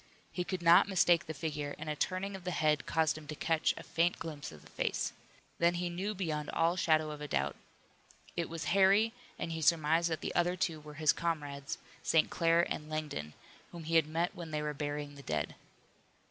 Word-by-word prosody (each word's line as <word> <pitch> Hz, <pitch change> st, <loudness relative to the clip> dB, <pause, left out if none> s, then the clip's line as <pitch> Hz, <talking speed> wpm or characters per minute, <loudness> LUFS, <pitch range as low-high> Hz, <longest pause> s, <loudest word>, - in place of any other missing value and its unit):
He 180 Hz, -, -2 dB
could 180 Hz, -1 st, -4 dB
not 170 Hz, +2 st, +7 dB
mistake 175 Hz, -3 st, +4 dB
the 160 Hz, -, -3 dB
figure, 145 Hz, -1 st, -3 dB
and -, -, -7 dB
a 150 Hz, -, -1 dB
turning 185 Hz, +5 st, -2 dB
of 190 Hz, -, -9 dB
the 180 Hz, -, -2 dB
head 155 Hz, -4 st, +1 dB
caused 155 Hz, -2 st, +1 dB
him 150 Hz, -, -14 dB
to 155 Hz, -, -5 dB
catch 160 Hz, +1 st, +2 dB
a -, -, -7 dB
faint 170 Hz, +1 st, +1 dB
glimpse 150 Hz, -3 st, -6 dB
of 75 Hz, -2 st, -13 dB
the -, -, -16 dB
face. -, -, -1 dB, 0.5 s
Then 170 Hz, +1 st, +4 dB
he 175 Hz, 0 st, -2 dB
knew 195 Hz, +5 st, -3 dB
beyond 155 Hz, -5 st, -2 dB
all 165 Hz, +1 st, +2 dB
shadow 155 Hz, -3 st, +2 dB
of 150 Hz, -, -7 dB
doubt. 70 Hz, -, 0 dB, 0.8 s
It 170 Hz, -1 st, -2 dB
was 165 Hz, -1 st, -4 dB
Harry 200 Hz, +3 st, +5 dB, 0.2 s
and 165 Hz, -, -3 dB
he 160 Hz, 0 st, -3 dB
surmised 165 Hz, +1 st, +3 dB
that 160 Hz, -, -2 dB
the -, -, -3 dB
other 175 Hz, +1 st, +2 dB
two 170 Hz, -4 st, -1 dB
were 150 Hz, 0 st, -11 dB
his 155 Hz, -1 st, +4 dB
comrades, 150 Hz, -2 st, -3 dB, 0.2 s
St. 160 Hz, -, +3 dB
Clair 165 Hz, 0 st, +3 dB
and 150 Hz, 0 st, -4 dB
Langdon, 150 Hz, -, -4 dB, 0.4 s
whom 170 Hz, -1 st, -8 dB
he 165 Hz, +1 st, -1 dB
had 160 Hz, -, +4 dB
met 165 Hz, +3 st, -1 dB
when 170 Hz, -2 st, -7 dB
they 150 Hz, -1 st, -2 dB
were 150 Hz, 0 st, -2 dB
burying 145 Hz, 0 st, -4 dB
the 140 Hz, -, -11 dB
dead. 75 Hz, -, -2 dB
160 Hz, 210 wpm, -33 LUFS, 150-175 Hz, 0.8 s, not